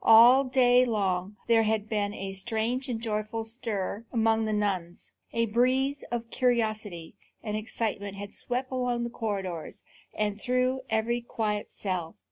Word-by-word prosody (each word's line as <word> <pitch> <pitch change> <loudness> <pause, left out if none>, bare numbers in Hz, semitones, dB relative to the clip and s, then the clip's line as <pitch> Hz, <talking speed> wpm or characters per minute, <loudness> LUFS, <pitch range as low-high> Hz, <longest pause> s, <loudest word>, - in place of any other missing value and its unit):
All 240 +4 +8
day 250 -1 +5
long 200 -4 0
there 230 -1 +5
had 220 -1 0
been 205 -2 0
a 195 -1 -5
strange 225 +6 -1
and 230 -2 -2
joyful 220 0 -2
stir 220 -3 -4
among 225 -1 +2
the 215 - -1
nuns. 190 -5 -2 0.2
A 230 0 +1
breeze 255 +5 +2
of 235 -1 -4
curiosity 215 -8 0 0.3
and 210 -2 -2
excitement 210 -2 -3
had 200 0 -7
swept 255 +2 -2
along 250 -2 0
the 235 - -3
corridors 195 -8 -4 0.3
and 210 -1 -1
through 255 +1 +1
every 225 +2 +1
quiet 215 -3 -2
cell. 180 -4 -3
220 Hz, 145 wpm, -28 LUFS, 205-240 Hz, 0.3 s, All